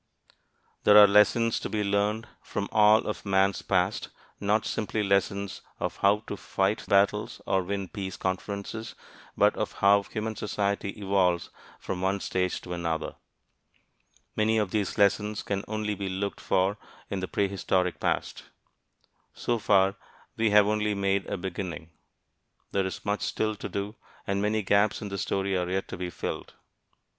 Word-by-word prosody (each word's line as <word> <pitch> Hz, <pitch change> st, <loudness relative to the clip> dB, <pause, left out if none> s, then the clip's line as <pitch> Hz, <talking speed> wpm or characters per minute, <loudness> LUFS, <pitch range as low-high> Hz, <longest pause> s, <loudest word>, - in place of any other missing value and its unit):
There 105 Hz, -, +7 dB
are 105 Hz, -, +11 dB
lessons 105 Hz, +3 st, +4 dB
to -, -, -5 dB
be 105 Hz, -1 st, -1 dB
learned 105 Hz, +3 st, 0 dB
from 100 Hz, -, -4 dB
all 105 Hz, 0 st, +5 dB
of 105 Hz, -, -4 dB
man's 95 Hz, -1 st, +2 dB
past, -, -, 0 dB, 0.3 s
not 105 Hz, +2 st, +1 dB
simply 110 Hz, 0 st, -1 dB
lessons 100 Hz, 0 st, 0 dB, 0.2 s
of -, -, -3 dB
how 100 Hz, +1 st, +3 dB
to -, -, -4 dB
fight 100 Hz, +1 st, -1 dB
battles 100 Hz, +1 st, +2 dB
or 95 Hz, -1 st, +2 dB
win 100 Hz, +1 st, -3 dB
peace 95 Hz, 0 st, -6 dB
conferences, 100 Hz, +4 st, -4 dB, 0.4 s
but -, -, +4 dB
of -, -, -3 dB
how 100 Hz, +1 st, +4 dB
human 110 Hz, +2 st, -4 dB
society 100 Hz, -1 st, -1 dB
evolves 95 Hz, -3 st, +1 dB, 0.3 s
from 90 Hz, -1 st, -4 dB
one 95 Hz, +1 st, +1 dB
stage 90 Hz, -1 st, -1 dB
to 90 Hz, -, -6 dB
another. 85 Hz, -2 st, -2 dB, 1.2 s
Many 110 Hz, +1 st, +2 dB
of 105 Hz, -4 st, 0 dB
these 105 Hz, -2 st, -1 dB
lessons 105 Hz, +1 st, +2 dB
can 100 Hz, -1 st, -2 dB
only 110 Hz, -1 st, -2 dB
be 100 Hz, -1 st, -4 dB
looked 100 Hz, +2 st, -3 dB
for 95 Hz, +3 st, +1 dB, 0.3 s
in 100 Hz, -, -1 dB
the 95 Hz, -, -3 dB
prehistoric 95 Hz, -2 st, 0 dB
past. -, -, -2 dB, 0.9 s
So 120 Hz, -1 st, -1 dB
far, 100 Hz, -1 st, +3 dB, 0.4 s
we 115 Hz, -1 st, +2 dB
have 105 Hz, 0 st, +6 dB
only 105 Hz, 0 st, 0 dB
made 100 Hz, 0 st, 0 dB
a -, -, -2 dB
beginning. 90 Hz, -3 st, -5 dB, 0.8 s
There 95 Hz, -1 st, +1 dB
is 95 Hz, -, -7 dB
much 105 Hz, 0 st, 0 dB
still 110 Hz, 0 st, -1 dB
to -, -, -6 dB
do, 100 Hz, +2 st, -4 dB, 0.3 s
and 100 Hz, 0 st, -1 dB
many 105 Hz, +1 st, +1 dB
gaps 100 Hz, +2 st, +3 dB
in 100 Hz, -, -5 dB
the 100 Hz, 0 st, -4 dB
story 95 Hz, +2 st, -1 dB
are 90 Hz, -1 st, -1 dB
yet 95 Hz, +1 st, -1 dB
to -, -, -5 dB
be 90 Hz, 0 st, -3 dB
filled. -, -, -5 dB
100 Hz, 160 wpm, -28 LUFS, 95-105 Hz, 1.2 s, are